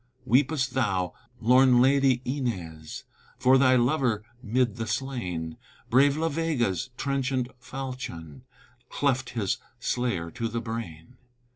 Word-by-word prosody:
Weepest 130 Hz, +1 st, +2 dB
thou, 95 Hz, -8 st, 0 dB, 0.3 s
lorn 125 Hz, +2 st, +5 dB
lady 135 Hz, -1 st, +4 dB
Inez, 90 Hz, -, -4 dB, 0.3 s
For 130 Hz, +1 st, +5 dB
thy 130 Hz, -1 st, +5 dB
lover 125 Hz, -4 st, +2 dB, 0.2 s
'mid 120 Hz, -1 st, 0 dB
the 115 Hz, -1 st, -3 dB
slain, 100 Hz, -10 st, -3 dB, 0.3 s
Brave 140 Hz, +4 st, +5 dB
La 165 Hz, +1 st, +1 dB
Vega's 135 Hz, -, -1 dB
trenchant 135 Hz, -2 st, -1 dB
falchion 125 Hz, -, -7 dB, 0.5 s
Cleft 135 Hz, -3 st, 0 dB
his 100 Hz, -4 st, 0 dB, 0.2 s
slayer 100 Hz, -10 st, -1 dB
to 115 Hz, -, -3 dB
the 115 Hz, +1 st, -3 dB
brain. 115 Hz, -2 st, -7 dB
125 Hz, 115 wpm, -27 LUFS, 105-135 Hz, 0.5 s, lorn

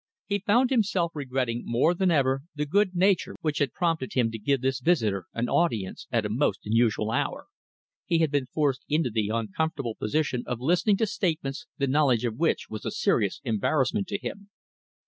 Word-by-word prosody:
He 205 Hz, 0 st, -1 dB
found 240 Hz, +7 st, +2 dB
himself 190 Hz, -8 st, +1 dB
regretting 130 Hz, -4 st, -2 dB
more 125 Hz, +9 st, +2 dB
than 185 Hz, +1 st, +1 dB
ever 135 Hz, -4 st, +2 dB
the 150 Hz, 0 st, -1 dB
good 190 Hz, +4 st, +1 dB
nature 190 Hz, +2 st, +2 dB
which 155 Hz, -3 st, -1 dB
had 140 Hz, -4 st, +1 dB
prompted 165 Hz, -7 st, -1 dB
him 120 Hz, -3 st, +2 dB
to 115 Hz, -, -6 dB
give 135 Hz, +4 st, +1 dB
this 135 Hz, 0 st, 0 dB
visitor 110 Hz, -, +1 dB
an 115 Hz, +1 st, -1 dB
audience 115 Hz, -, 0 dB
at 115 Hz, -3 st, +1 dB
a -, -, +1 dB
most 110 Hz, -2 st, 0 dB
unusual 110 Hz, 0 st, +1 dB
hour. -, -, -2 dB, 0.6 s
He 170 Hz, -, +2 dB
had 160 Hz, -3 st, +2 dB
been 140 Hz, -3 st, 0 dB
forced 140 Hz, -2 st, 0 dB
into 150 Hz, -5 st, +1 dB
the 105 Hz, -1 st, 0 dB
uncomfortable 115 Hz, +4 st, -2 dB
position 125 Hz, +3 st, -1 dB
of 125 Hz, -, -3 dB
listening 180 Hz, -, +2 dB
to 225 Hz, -, +2 dB
statements 170 Hz, -, -2 dB
the 140 Hz, -, +1 dB
knowledge 135 Hz, -4 st, +2 dB
of 115 Hz, -2 st, -2 dB
which 165 Hz, -, +1 dB
was 110 Hz, -, -7 dB
a -, -, -2 dB
serious -, -, 0 dB
embarrassment 140 Hz, -, 0 dB
to 200 Hz, -, -2 dB
him. 200 Hz, 0 st, -7 dB
140 Hz, 185 wpm, -27 LUFS, 120-170 Hz, 0.6 s, found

